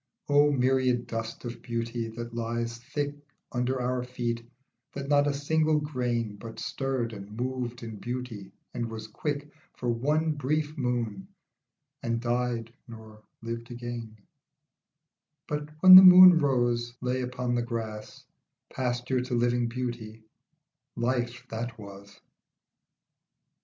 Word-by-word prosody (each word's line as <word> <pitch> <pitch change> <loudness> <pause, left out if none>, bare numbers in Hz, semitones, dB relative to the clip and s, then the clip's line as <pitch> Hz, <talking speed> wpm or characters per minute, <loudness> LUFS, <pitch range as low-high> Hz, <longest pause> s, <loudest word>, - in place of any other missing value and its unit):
O 145 +1 +5
myriad 130 -2 +2
dust 115 +1 -5
of 120 0 -6
beauty 115 0 -3
that 120 +1 -7
lies 115 0 -3
thick 145 +3 -3 0.4
Under 125 +1 -1
our 125 0 -1
feet 120 -2 -3 0.5
that 140 0 -5
not 145 0 +4
a - - +2
single 155 +2 +2
grain 120 -7 -2
But 115 +2 -9
stirred 130 -4 -2
and 105 +1 -9
moved 125 -1 -3
in 110 -2 -7
beauty 120 -5 -6 0.2
and 120 -1 -3
was 110 -1 -7
quick 145 +5 -4 0.3
For 125 - -2
one 150 +7 +1
brief 150 +1 -1
moon 120 -7 -2 0.7
and 115 0 -1
died 120 -1 -2
nor 110 -2 -12 0.2
lived 115 0 -5
again; 120 -2 -7 1.3
But 150 0 -3
when 185 0 +11
the 185 - +14
moon 180 -2 +10
rose 120 -4 +1
lay 125 +1 -1
upon 125 0 -2
the 120 - +1
grass 115 -2 -6 0.5
Pasture 125 0 -1
to 125 0 -3
living 120 0 +1
beauty, 115 -3 -5 0.7
life 120 0 -1
that 115 +1 -5
was. 100 -1 -12
120 Hz, 125 wpm, -28 LUFS, 115-130 Hz, 1.3 s, the